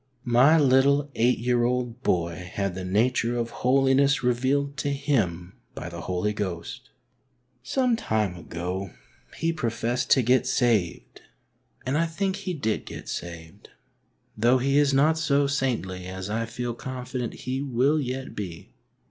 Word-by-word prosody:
My 130 Hz, +6 st, +5 dB
little 140 Hz, 0 st, +3 dB
eight 120 Hz, +3 st, +2 dB
year 120 Hz, 0 st, +1 dB
old 125 Hz, 0 st, -1 dB
boy 90 Hz, -4 st, -1 dB
had 100 Hz, -2 st, -1 dB
the 95 Hz, +1 st, -5 dB
nature 115 Hz, +5 st, +1 dB
of 115 Hz, -1 st, -2 dB
holiness 135 Hz, +3 st, +3 dB
revealed 135 Hz, +3 st, +1 dB
to 145 Hz, -, -1 dB
him 105 Hz, -, -1 dB, 0.2 s
by 85 Hz, -, -6 dB
the 85 Hz, -1 st, -7 dB
Holy 90 Hz, +5 st, -1 dB
Ghost. 90 Hz, -5 st, -5 dB, 0.7 s
Some 245 Hz, -, +1 dB
time 110 Hz, -, -1 dB
ago 90 Hz, +2 st, -5 dB, 0.4 s
he 165 Hz, +1 st, 0 dB
professed 120 Hz, -3 st, -2 dB
to 130 Hz, -, +5 dB
get 125 Hz, +3 st, +3 dB
saved, 110 Hz, -9 st, 0 dB, 0.6 s
and 135 Hz, +4 st, 0 dB
I 165 Hz, -, +2 dB
think 190 Hz, +4 st, -2 dB
he 195 Hz, -2 st, -4 dB
did 110 Hz, -7 st, -2 dB
get -, -, -8 dB
saved, 85 Hz, -2 st, -7 dB, 0.7 s
though 120 Hz, +4 st, +4 dB
he 135 Hz, +3 st, +2 dB
is 145 Hz, -1 st, +3 dB
not 150 Hz, +4 st, +3 dB
so 145 Hz, -3 st, +2 dB
saintly 115 Hz, -10 st, -2 dB
as 95 Hz, +2 st, -6 dB
I 115 Hz, +1 st, -1 dB
feel 120 Hz, +1 st, -4 dB
confident 125 Hz, -1 st, -5 dB
he 130 Hz, +1 st, -2 dB
will 140 Hz, +3 st, +1 dB
yet 130 Hz, 0 st, -5 dB
be. 90 Hz, -5 st, -7 dB
125 Hz, 150 wpm, -26 LUFS, 100-140 Hz, 0.7 s, My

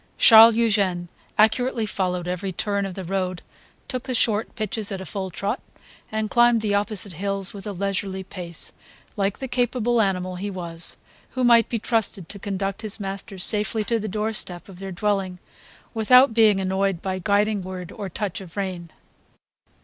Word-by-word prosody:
Charles 225 Hz, 0 st, +9 dB
Eugene 200 Hz, -6 st, +1 dB, 0.3 s
accurately 230 Hz, +2 st, +3 dB
followed 180 Hz, -3 st, -2 dB
every 180 Hz, +2 st, -3 dB
turn 200 Hz, +2 st, -1 dB
of 185 Hz, -, -8 dB
the 190 Hz, -, -5 dB
road, 185 Hz, 0 st, -2 dB, 0.4 s
took 255 Hz, -1 st, -4 dB
the 255 Hz, -2 st, -2 dB
short 220 Hz, -1 st, +1 dB
pitches 215 Hz, -1 st, -2 dB
at 195 Hz, -, -3 dB
a 190 Hz, -, -7 dB
full 190 Hz, +2 st, -4 dB
trot 200 Hz, +6 st, -2 dB, 0.5 s
and 220 Hz, 0 st, -1 dB
climbed 240 Hz, +1 st, +4 dB
the 210 Hz, -2 st, 0 dB
opposite 205 Hz, -1 st, 0 dB
hills 195 Hz, +2 st, -3 dB
with 200 Hz, 0 st, -8 dB
a -, -, -2 dB
leisurely 195 Hz, 0 st, -2 dB
pace, 175 Hz, -3 st, -8 dB, 0.4 s
like 200 Hz, -2 st, 0 dB
the 265 Hz, -, -5 dB
capable 245 Hz, -1 st, +1 dB
animal 185 Hz, -2 st, -1 dB
he 200 Hz, +3 st, -4 dB
was, 170 Hz, -3 st, -6 dB, 0.4 s
who 255 Hz, -, +1 dB
might 235 Hz, -2 st, +5 dB
be 235 Hz, -, 0 dB
trusted 220 Hz, -5 st, -1 dB
to 200 Hz, -, -7 dB
conduct 195 Hz, 0 st, -3 dB
his 215 Hz, -2 st, -4 dB
masters 195 Hz, -1 st, -5 dB
safely 215 Hz, +1 st, +2 dB
to 230 Hz, +2 st, 0 dB
the 215 Hz, -, -4 dB
door 215 Hz, +2 st, -2 dB
step 175 Hz, -4 st, -1 dB
of 185 Hz, -3 st, -12 dB
their 195 Hz, 0 st, -6 dB
dwelling 195 Hz, -1 st, -1 dB, 0.6 s
without 250 Hz, +3 st, +6 dB
being 215 Hz, -3 st, +5 dB
annoyed 190 Hz, -1 st, 0 dB
by 185 Hz, 0 st, -3 dB
guiding 205 Hz, +2 st, +1 dB
word 180 Hz, -1 st, -7 dB
or 200 Hz, -3 st, -6 dB
touch 200 Hz, +1 st, -4 dB
of 180 Hz, 0 st, -12 dB
rein. 185 Hz, -4 st, -3 dB
200 Hz, 175 wpm, -24 LUFS, 185-220 Hz, 0.6 s, Charles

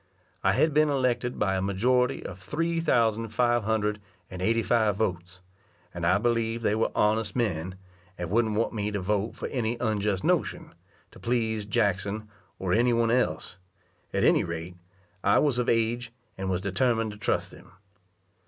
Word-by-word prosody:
I 95 Hz, -, +4 dB
had 145 Hz, +7 st, +2 dB
been 155 Hz, +1 st, +4 dB
elected 125 Hz, -3 st, 0 dB
by 95 Hz, -1 st, +1 dB
a 95 Hz, -, 0 dB
majority 125 Hz, +7 st, +1 dB
of 95 Hz, -, -7 dB
three 165 Hz, -, -1 dB
thousand 115 Hz, -8 st, +2 dB
five 120 Hz, 0 st, +1 dB
hundred 105 Hz, -1 st, 0 dB, 0.3 s
and 90 Hz, 0 st, -6 dB
eighty 115 Hz, +4 st, +2 dB
five 110 Hz, -3 st, +2 dB
votes, 90 Hz, -4 st, -3 dB, 0.5 s
and 85 Hz, -1 st, -2 dB
I 90 Hz, -, +4 dB
believed 115 Hz, +1 st, 0 dB
they 105 Hz, -, +2 dB
were 110 Hz, +1 st, +1 dB
honest 105 Hz, +1 st, +1 dB
men, 90 Hz, -7 st, -1 dB, 0.4 s
and 85 Hz, 0 st, -5 dB
wouldn't 110 Hz, -1 st, +2 dB
want 115 Hz, +3 st, 0 dB
me 105 Hz, -2 st, -2 dB
to 105 Hz, -1 st, -2 dB
vote 105 Hz, +3 st, -1 dB
for -, -, -5 dB
any 120 Hz, -2 st, -1 dB
unjust 105 Hz, -4 st, 0 dB
notion, -, -, 0 dB, 0.4 s
to -, -, -15 dB
please 110 Hz, -3 st, -1 dB
Jackson 105 Hz, -1 st, 0 dB, 0.3 s
or 90 Hz, -2 st, -1 dB
any 120 Hz, +3 st, +3 dB
one 115 Hz, -1 st, +2 dB
else; 125 Hz, -6 st, -1 dB, 0.5 s
at -, -, 0 dB
any -, -, +4 dB
rate, 85 Hz, +1 st, -5 dB, 0.5 s
I 100 Hz, -, +4 dB
was 140 Hz, -5 st, +2 dB
of 125 Hz, -, 0 dB
age, 115 Hz, +1 st, 0 dB, 0.2 s
and 95 Hz, 0 st, -4 dB
was 90 Hz, -1 st, 0 dB
determined 115 Hz, +3 st, +1 dB
to 105 Hz, -, -10 dB
trust 105 Hz, -, -1 dB
them. -, -, -15 dB
110 Hz, 170 wpm, -27 LUFS, 100-120 Hz, 0.5 s, I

